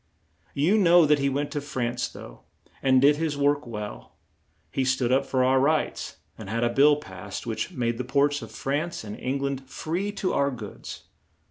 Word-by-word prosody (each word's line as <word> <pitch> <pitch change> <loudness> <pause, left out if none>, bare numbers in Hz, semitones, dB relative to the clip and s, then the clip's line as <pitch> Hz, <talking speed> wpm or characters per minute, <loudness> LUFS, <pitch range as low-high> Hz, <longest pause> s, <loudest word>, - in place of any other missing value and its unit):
You 175 +10 +3
know 175 -3 +6
that 150 -1 +3
he 140 0 +1
went 145 +2 -2
to 145 - -2
France 125 -4 -2
though, - - -12 0.4
and 130 -1 +4
did 145 +2 +5
his 155 -2 -1
work 145 -1 +1
well. 105 - -7 0.6
He 135 - 0
stood 130 -1 +1
up 135 +1 +2
for 130 -1 +1
our 130 +1 +4
rights 150 +4 0 0.2
and 105 -3 -8
had 115 +2 -1
a 120 - +2
bill 145 +3 +6
passed 95 -11 -8
which - - -3
made 120 -1 -2
the - - -1
ports 140 +3 +1
of - - -8
France 150 +4 -3
and 105 -1 -7
Eng 135 +2 -2
land 135 -1 -3
free 180 +9 -3
to 195 -2 -1
our 140 0 +2
goods. 115 -6 -8
140 Hz, 195 wpm, -26 LUFS, 125-145 Hz, 0.6 s, know